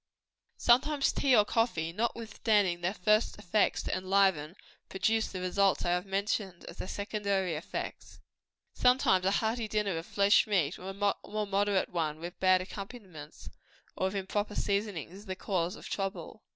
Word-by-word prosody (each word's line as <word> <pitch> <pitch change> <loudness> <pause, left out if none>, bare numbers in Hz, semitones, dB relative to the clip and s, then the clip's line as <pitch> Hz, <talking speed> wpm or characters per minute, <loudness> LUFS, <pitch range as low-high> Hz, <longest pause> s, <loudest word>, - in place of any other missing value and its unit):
Sometimes 275 +4 +3
tea 265 -3 +3
or 210 -2 +5
coffee, 175 -9 0
notwithstanding 215 -4 0
their 185 +4 -1
first 215 +4 +2
effects 210 +1 +1
to - - -2
enliven, 185 -4 +1 0.3
produce 220 +3 +1
the 185 - -5
results 190 +1 +1
I 175 - +1
have 180 +2 -1
mentioned, 195 -2 -2
as 170 - -10
their - - -5
secondary 200 -3 -1
effects. 155 +1 -6 0.5
Sometimes 250 -7 +3
a - - +5
hearty 220 +3 0
dinner 210 -3 -1
of 165 - -10
flesh 200 +1 +4
meat, 180 -6 0
or 185 - -7
a - - -5 0.3
more 215 0 -2
moderate 200 -1 +1
one, 155 -3 -2
with 175 +2 -8
bad 185 -1 +4
accompaniments, 190 -6 -9 0.4
or 190 - 0
with 190 - -5
improper 205 +2 -2
seasonings, 200 -5 -2
is 200 +2 -12
the 185 - -3
cause 185 -3 -2
of - - -10
trouble. 195 0 -4
195 Hz, 160 wpm, -30 LUFS, 180-210 Hz, 0.5 s, or